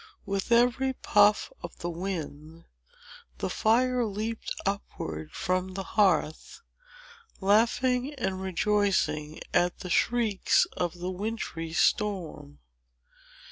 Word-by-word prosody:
With 195 +3 -3
every 245 +3 +3
puff 210 -3 +3
of 170 - -8
the 175 - -4
wind, 165 -3 -6 0.7
the - - -3
fire 250 +2 +2
leaped 220 +1 -4
upward 80 - -4
from 185 0 -2
the 195 - -3
hearth, 195 - +1 0.8
laughing 245 +7 +2
and 190 -7 -2
rejoicing 190 -5 0
at 175 0 +1
the 180 - -5
shrieks 230 -3 +2
of 175 0 -2
the 180 +1 -4
wintry 185 -5 -4
storm. 175 - 0
195 Hz, 100 wpm, -28 LUFS, 175-225 Hz, 0.8 s, every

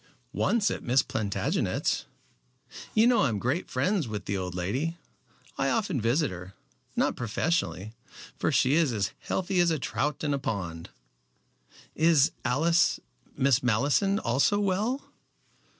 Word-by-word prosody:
"Once 225 -3 +1
at - - -4
Miss 125 +2 +2
Plantagenet's. 100 -3 -1 0.9
You 220 - +5
know 245 0 +4
I 145 - +3
am 110 - -2
great 130 - -2
friends 175 - 0
with 105 -2 -5
the 100 - -2
old 90 -2 -4
lady. 130 - -2 0.6
I 135 - +2
often 195 - 0
visit 125 - +1
her, 90 +1 -9 0.4
not - - +1
professionally, 115 - -2 0.4
for - - 0
she 130 - +3
is 160 -3 +3
as 100 -3 -1
healthy 190 0 -1
as 175 -1 +4
a 160 - +1
trout 150 +2 -2
in 145 -1 0
a 140 - -1
pond." 90 -10 -4 1.0
"Is 155 -3 +4
Alice 165 +6 +2 0.4
Miss 135 -2 +3
Malleson 140 - +2
also 140 - +2
well?" 205 +7 -1
140 Hz, 140 wpm, -28 LUFS, 110-175 Hz, 1.0 s, You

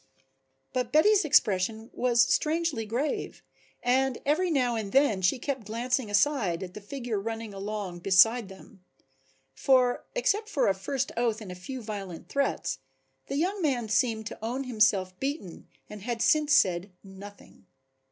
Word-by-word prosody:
But 255 -1 -1
Betty's 400 +7 +5
expression 220 -5 +2
was 240 -1 +3
strangely 310 -7 0
grave 255 +7 -3 0.4
and 260 +1 +2
every 325 +6 +2
now 255 -6 +1
and 215 -3 -4
then 265 -7 +3
she 185 +8 +2
kept 255 -4 -4
glancing 240 +1 -1
aside 205 - +1
at 180 -1 -8
the 210 - -9
figure 235 -1 -4
running 225 0 -5
along 195 -2 -5
beside 200 +4 +4
them. 190 -1 -15 0.7
For, 250 - +2
except 435 -3 0
for 300 - +1
a 195 - +4
first 260 +7 -3
oath 230 -2 0
and 205 -5 -8
a - - -5
few 235 +8 -7
violent 195 -5 -7
threats, 275 - -1 0.5
the - - -4
young 375 +6 -1
man 250 -8 0
seemed 220 -1 +1
to 210 - -8
own 250 +4 -2
himself 205 -6 +1
beaten 270 - -5 0.2
and 210 -1 -10
had 230 +1 -2
since 300 -1 +4
said 185 -2 +2
nothing. 200 +1 -13
230 Hz, 150 wpm, -28 LUFS, 200-270 Hz, 0.7 s, Betty's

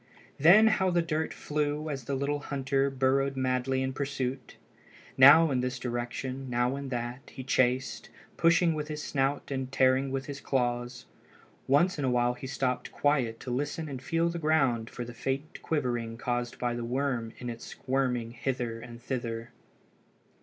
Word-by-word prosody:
Then 180 +10 +8
how 210 -4 +3
the 175 -1 +2
dirt 160 0 -1
flew 150 +1 -2
as 135 -5 -4
the 140 - -2
little 140 +2 -1
hunter 140 -1 0
burrowed 135 +1 +1
madly 130 0 0
in 130 0 -2
pursuit! 135 -2 -3 0.6
Now 145 +4 +8
in 130 - +1
this 125 0 -2
direction, 125 +2 -4
now 120 +2 +1
in 140 -1 -5
that, 120 +1 -4
he 130 - -7
chased, 130 0 0 0.3
pushing 170 0 +4
with 150 -1 -3
his 150 -1 -5
snout 135 +1 -1
and 130 -1 -3
tearing 130 +1 +3
with 135 0 -3
his 145 0 -7
claws. 120 -1 -1 0.6
Once 150 +5 +3
in - - -1
a - - +2
while 120 0 +2
he 130 +2 -8
stopped 130 -1 -2
quiet 130 -6 +1
to 125 - -5
listen 145 +5 -2
and 135 -3 -6
feel 165 +4 +1
the 170 0 -4
ground 135 -8 +2
for 120 - -6
the 120 - -8
faint 135 +5 -4
quivering 120 -7 -2
caused 120 0 -2
by 120 -1 -1
the 120 0 -4
worm 125 -2 -1
in 125 - -7
its 115 -1 -6
squirming 125 -3 -1
hither 120 -1 -3
and 120 0 -11
thither. 115 -3 -4
130 Hz, 170 wpm, -29 LUFS, 120-145 Hz, 0.6 s, Then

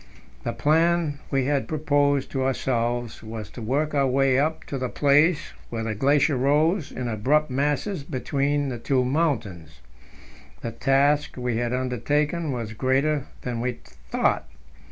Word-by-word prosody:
The - - -2
plan 160 -1 +2
we 135 -2 +1
had 140 -1 0
proposed 145 -3 +1
to 135 -1 -1
ourselves 120 -3 -1
was 110 -2 -7
to 120 - -9
work 145 +7 0
our 140 -2 +3
way 135 0 +3
up 155 +3 0
to 135 - -5
the 130 -1 -2
place 150 +3 +3 0.2
where 115 -1 -3
the 110 -1 -2
glacier 140 +5 +2
rose 150 +6 +2
in 125 - -4
abrupt 130 +7 +1
masses 145 +6 -1
between 140 0 -1
the 120 -2 -5
two 130 +1 +1
mountains. 115 - -1 0.8
The - - -4
task 140 +2 +2
we 125 -2 -1
had 120 0 -1
undertaken 145 +6 0
was 115 -4 -4
greater 135 +4 +1 0.2
than 120 -2 -3
we 125 +1 -1 0.4
thought. - - +1
135 Hz, 150 wpm, -25 LUFS, 125-150 Hz, 0.8 s, our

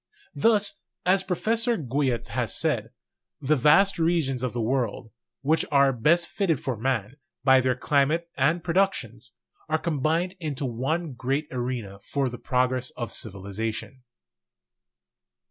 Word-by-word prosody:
Thus, 210 -3 +2 0.2
as 185 +1 +4
Professor 225 +6 0
Guyot 130 -4 -1
has - - -1
said, - - 0 0.5
"the 150 +1 +2
vast 170 +8 +4
regions 160 -6 +1
of 125 -2 -1
the 120 - -4
world, 120 -1 -1 0.3
which 155 +4 +2
are 140 -1 +5
best 160 +9 +3
fitted 170 - 0
for 130 -2 -3
man, 120 +1 -2 0.3
by 130 -1 +6
their 130 -1 +1
climate 145 +7 +1
and 160 +6 +1
productions, 130 - -1 0.4
are 160 - +2
combined 165 +3 0
into 150 -4 -3
one 135 +6 -2
great 135 +5 -2
arena 120 -6 -4
for 135 +6 -2
the 125 - -8
progress 130 0 0
of 120 -2 -4
civilization." 110 +5 -4
135 Hz, 130 wpm, -26 LUFS, 125-165 Hz, 0.5 s, by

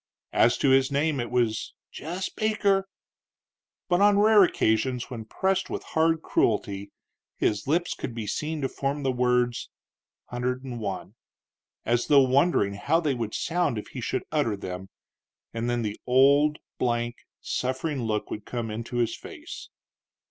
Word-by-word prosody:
As 120 +1 +4
to 135 - +3
his 135 +1 +4
name, 145 0 +1
it 120 -1 -2
was 120 -3 0 0.2
"jess 180 +5 -4
Baker;" 200 -3 +1 1.0
but 175 0 +2
on 205 0 +6
rare 210 0 +7
occasions, 125 -4 +1
when 115 -3 -6
pressed 190 - 0
with - - -4
hard 160 0 +1
cruelty, 100 -2 0 0.5
his 105 +1 0
lips 170 +4 +1
could 120 - -6
be 115 -2 -4
seen 150 +8 -3
to 135 - +1
form 140 +2 -3
the 135 - +2
words, 125 -1 +1 0.6
"Hunder'd'n 125 0 -3
One," 100 -3 -4 0.7
as 120 +1 +1
though 145 -2 +7
wondering 130 - +3
how 130 +11 +1
they 155 -5 0
would 115 -4 -3
sound 170 -8 0
if 105 - -6
he 130 - -7
should 115 - -2
utter 145 -9 +1
them, 95 0 -6 0.6
and 115 +1 -2
then 120 -1 0
the 105 -1 -4
old 140 +4 +5 0.2
blank, 120 -1 0 0.2
suffering 130 +2 -2
look 110 -2 -2
would 105 - -5
come 115 -2 -4
into 115 +3 -5
his 115 -1 +1
face. - - -10
125 Hz, 155 wpm, -26 LUFS, 115-155 Hz, 1.0 s, rare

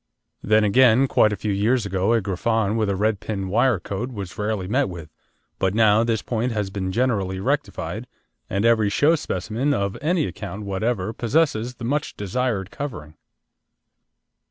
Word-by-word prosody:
Then, 110 +1 +3
again, 125 +4 +5
quite 110 - +3
a - - -1
few 105 0 -3
years 110 +4 +1
ago 95 +2 +1
a 115 - +3
Griffon 105 +2 0
with 110 -2 0
a 100 - 0
red 105 +1 0
pin 95 -3 -4
wire 120 +1 +2
coat 105 +8 -4
was 100 -6 -7
rarely 105 -3 -2
met 130 +3 +1
with, 85 -3 -9 0.5
but 95 +1 +1
now 110 0 +5
this 115 -2 -1
point 120 +1 -1
has 105 -3 -2
been 95 -1 -3
generally 100 -5 0
rectified, 130 -2 -2 0.4
and 100 +3 0
every 110 -3 +4
show 145 +10 +3
specimen 130 - -1
of 100 0 -1
any 160 +1 +1
account 105 0 -6
whatever 100 +1 -1
possesses 125 -1 0
the 120 - -7
much 145 +4 -2
desired 105 -1 -2
covering. 105 - -6
110 Hz, 165 wpm, -23 LUFS, 100-125 Hz, 0.5 s, again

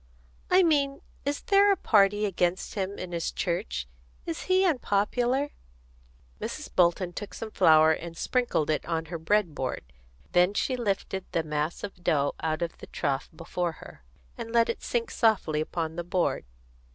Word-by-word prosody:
"I 370 +1 +6
mean, 280 -4 +2 0.2
is 285 +1 -1
there 405 -2 +5
a - - +4
party 205 -1 +3
against 180 -2 -1
him 200 -1 -3
in 185 -1 -6
his 170 -1 -2
church? 170 - -2 0.4
Is 165 - -4
he 375 +1 +3
unpopular?" 250 - +1 0.9
Mrs. - - -5
Bolton 175 0 +3
took 205 +3 -7
some 220 -1 -6
flour 155 -3 +6
and 165 +1 -4
sprinkled 240 - 0
it 155 - 0
on 165 -1 -1
her 165 - -3
bread 185 0 +1
board; 125 - -4 0.4
then 180 +3 +4
she 260 - 0
lifted 195 -4 -2
the 165 - +1
mass 150 +1 -2
of 195 -3 -7
dough 145 -5 +2
out 160 +1 -1
of 170 - -5
the - - -10
trough 135 -1 -2
before 170 +1 -3
her, 65 - -13 0.4
and 225 - -5
let 230 0 +3
it - - -2
sink 235 -1 -2
softly 190 -9 +2
upon 160 0 -3
the 175 - -2
board. 175 0 0
185 Hz, 165 wpm, -28 LUFS, 165-230 Hz, 0.9 s, I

